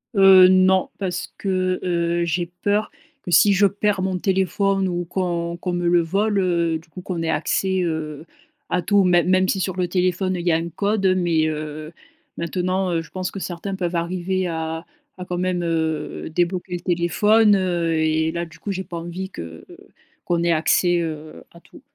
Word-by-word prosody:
Heu, 190 -1 +8
non. 185 0 +4
Parce 180 -3 -4
que, 185 -2 -1
heu, 170 -1 0
j'ai 170 +1 -1 0.2
peur 205 +1 +1 0.3
que 175 - -6
si 200 +3 +6
je 200 +2 +4
perds 205 0 -1
mon 190 0 -1
téléphone 190 +1 +1
ou 175 -1 -2
qu'on 170 -1 -2
qu'on 180 +1 -3
me 175 0 -1
le 175 0 +4
vole 200 +5 0
heu, 170 -3 +1
du 165 +1 -22
coup 185 - -9
qu'on 175 -2 -4
ait 165 - -2
accès 190 +3 0
heu, 155 -2 -4 0.4
à 180 - 0
tout, 200 +3 +3
mê 175 -1 +4
même 185 +1 +2
si 195 - 0
sur 185 -1 -2
le 180 -1 -1
téléphone 185 +1 0
il 175 -1 -5
y - - +4
a 160 - +3
un 165 +1 -2
code 200 +4 -1
mais, 170 -3 +1
heu, 155 0 -5 0.5
maintenant, 185 +2 -1
heu, 165 -1 0
je 165 - -14
pense 185 -1 -3
que 195 - -6
certains 185 +2 -5
peuvent 175 -2 -3
arriver 180 +2 -1
à 160 0 -4 0.3
à 180 - -7
quand 180 -1 -4
même 180 -1 -1
heu, 160 -3 -2
débloquer 175 +2 -1
le - - -4
téléphone 200 +5 +3
heu, 175 -3 0
et 160 0 +1
là, 170 0 -3
du 165 -1 -15
coup, 200 +5 -5
j'ai 190 0 -4
pas 175 - -8
envie 175 +3 -6
que 85 - -9 0.6
qu'on 170 -1 0
ait 170 - +3
accès, 175 +2 +2
heu, 155 - -6
à - - -16
tout. - - -18
175 Hz, 195 wpm, -22 LUFS, 170-190 Hz, 0.6 s, Heu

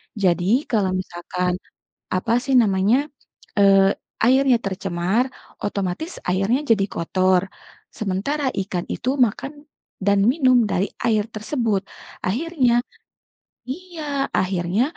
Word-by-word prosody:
Jadi 195 - +2
kalau 195 -5 +1
misalkan, 180 0 -3 0.5
apa 185 +5 0
sih 270 +2 -1
namanya, 230 +4 +3 0.5
eee, 195 -1 +6 0.3
airnya 260 +1 +5
tercemar, 195 +3 -1 0.4
otomatis 200 - -3
airnya 195 +9 +1
jadi 200 -3 +4
kotor, 185 +2 +2 0.5
sementara 240 +9 -1
ikan 180 -2 -4
itu 255 - -2 0.2
makan, 270 +7 -6 0.5
dan 200 0 +3
minum 255 -5 +4
dari 195 0 0 0.2
air 215 -3 +3
tersebut. 215 -2 -1 0.4
Akhirnya 245 - +1 0.9
iya, 300 -3 -3
akhirnya 185 +3 +1
205 Hz, 100 wpm, -22 LUFS, 185-255 Hz, 0.9 s, eee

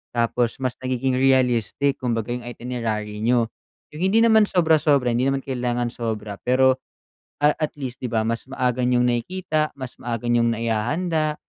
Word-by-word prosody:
tapos 120 0 +1
mas 130 -1 -1
nagiging 130 0 -1
realistic 130 0 +2
kumbaga 120 -2 -1
yung 125 - -7
itinerary 115 -4 -4
n'yo, 120 0 +3 0.5
yung 155 - -7
hindi 195 +4 +3
naman 220 -2 +5
sobra-sobra, 155 -7 +3
hindi 125 +3 +1
naman 135 0 -1
kailangan 120 -2 -1
sobra 110 -3 -4
pero, 130 +1 +3 0.7
ah, 150 - +6
at 155 - -2
least 130 -4 -6
di 125 - -3
ba 110 -1 0
mas 115 +2 -2
maaga 125 -2 -1
niyong 125 0 +3
nakikita, 155 +6 -1
mas 130 -2 -8
maaga 120 -1 -4
niyong 115 -1 +3
naihahanda 150 +8 -1
125 Hz, 155 wpm, -23 LUFS, 115-140 Hz, 0.7 s, ah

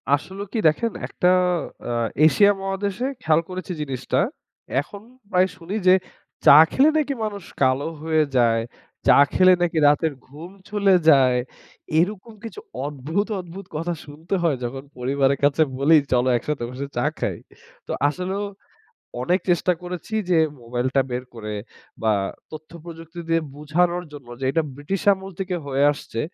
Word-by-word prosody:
আসলেও 190 +7 -7
কি 230 - 0
দেখেন 230 +9 +1 0.2
একটা 180 - 0 0.6
আ - - -1 0.3
এশিয়া 200 +6 +6
মহাদেশে 195 +4 -2 0.2
খেয়াল 160 0 +3
করেছি 185 0 -6
জিনিসটা। 135 -3 -2 0.6
এখন 200 -1 -11 0.3
প্রায় 185 0 +3
শুনি 180 +3 -6
যে 185 - +8 0.5
চা 140 - +10
খেলে 280 +4 +5
নাকি 290 -2 0
মানুষ 205 -4 -4 0.2
কালো 130 +2 +2 0.2
হয়ে 160 -1 +2
যায়। 115 -2 +3 0.5
চা - - +7 0.2
খেলে 185 0 +6
নাকি 175 -1 0
রাতের 150 +2 +2
ঘুম 155 +7 -11 0.2
চলে 200 -2 +3
যায়। 130 -4 +5 0.6
এরকম 205 +5 -1
কিছু 230 - -7 0.3
অদ্ভুত, 150 +8 -2
অদ্ভুত 180 +2 -9
কথা 165 +3 -2
শুনতে 155 +6 -5
হয় 155 -5 +2
যখন 135 +3 -4
পরিবারের 135 +2 +1
কাছে 145 +2 +3 0.2
বলি, 145 +4 +5 0.2
"চল 125 -1 +3
একসাথে 145 +2 -3
বসে 130 +3 -5
চা - - +1
খাই।" - - -2 0.5
তো - - -5 0.2
আসলেও 185 +5 -3 0.8
অনেক 180 +9 +1
চেষ্টা 180 +1 +3
করেছি 180 +4 -7 0.2
যে 175 - +4 0.2
মোবাইলটা 125 +3 0
বের 125 +1 -2
করে 110 -2 -6 0.5
বা 110 -1 +3 0.4
তথ্য 155 0 -10
প্রযুক্তি 165 0 -10
দিয়ে 165 0 +2
বোঝানোর 175 +4 0
জন্য 140 -4 -11
যে 135 - -3
এটা 165 +2 +1
ব্রিটিশ 145 +7 -3
আমল 190 0 -8
থেকে 190 -1 -2
হয়ে 140 0 0
আসছে। 115 -5 -7
165 Hz, 150 wpm, -23 LUFS, 140-185 Hz, 0.8 s, চা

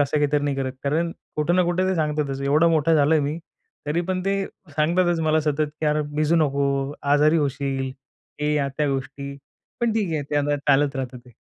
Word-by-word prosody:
असं 145 +1 +1
काहीतरी 145 0 +1
नाही 140 -1 -1
करत. 130 -1 -2
कारण 160 +4 0 0.3
कुठं 155 +3 +1
ना 180 - +5
कुठे 175 +2 +1
ते 190 - +1
सांगतातच. 150 -4 -1
एवढा 150 +4 +4
मोठा 160 0 +3
झालोय 150 +1 +4
मी, 145 +3 -2 0.5
तरी 150 +4 0
पण 185 -1 0
ते 195 0 +1 0.4
सांगतातच 170 +2 +2
मला 155 0 +3
सतत 150 0 0
की 155 - 0
"अरे 150 0 +2
भिजू 155 +2 +2
नको. 140 -2 +1 0.2
आजारी 150 +2 +4
होशील." 135 -1 -3 0.5
हे 150 0 +1
या-त्या 140 0 0
गोष्टी. 140 +1 -4 0.4
पण 235 -2 +2
ठीक 205 -7 0
आहे 150 - -1
ते 145 - 0
आता 145 0 +1
चालत 140 0 +3
राहतं 130 -1 -4
ते. 125 +1 -18
150 Hz, 195 wpm, -23 LUFS, 140-160 Hz, 0.5 s, ना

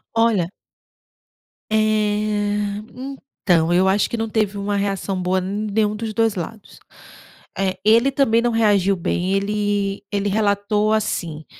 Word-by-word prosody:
Olha 225 -7 +2 1.2
eh, 210 -1 0 0.6
então, 170 -3 +3
eu 185 +2 +3
acho 195 +1 +2
que 235 - -3
não 225 0 -2
teve 210 -2 0
uma 200 +1 -2
reação 195 -1 -2
boa 185 +1 +1
n 205 +3 -3
nenhum 210 0 +1
dos 220 0 -4
2 225 -1 +1
lados. 195 +4 -7 0.8
Eh, 190 -1 -1
ele 230 +5 +5
também 255 -4 +2
não 240 0 +1
reagiu 205 -4 +3
bem. 180 +1 -1
Ele 205 0 -1
ele 205 0 0
relatou 205 +1 +1
assim: 170 -8 -2
205 Hz, 135 wpm, -21 LUFS, 195-215 Hz, 1.2 s, ele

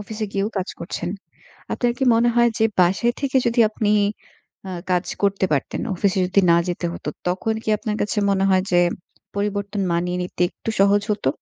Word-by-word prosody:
অফিসে 215 +1 -5
গিয়েও 200 +1 0
কাজ 185 - -3
করছেন। 175 0 -4 0.6
আপনার 245 -1 +1
কি 265 - 0
মনে 235 +1 +3
হয় 240 0 +5
যে 220 - +4
বাসায় 195 +7 +3
থেকে 270 -1 +1
যদি 235 +1 +1
আপনি 210 -1 0 0.8
অ - - -5 0.2
কাজ 180 0 +2 0.2
করতে 200 -1 +2
পারতেন, 140 - -1
অফিসে 195 +1 +1
যদি 195 +2 +3
না 170 - +6
যেতে 175 0 -2
হতো, - - -7 0.2
তখন 190 +5 -1
কি - - -8
আপনার 215 -2 -3
কাছে 210 - -1
মনে 195 -1 +2
হয় 185 -1 +4
যে 175 - +5 0.6
পরিবর্তন 200 0 -2
মানিয়ে 180 +1 -1
নিতে 180 0 -3
একটু - - -6
সহজ 200 +1 +4
হতো? 205 -10 0
200 Hz, 185 wpm, -22 LUFS, 180-220 Hz, 0.8 s, না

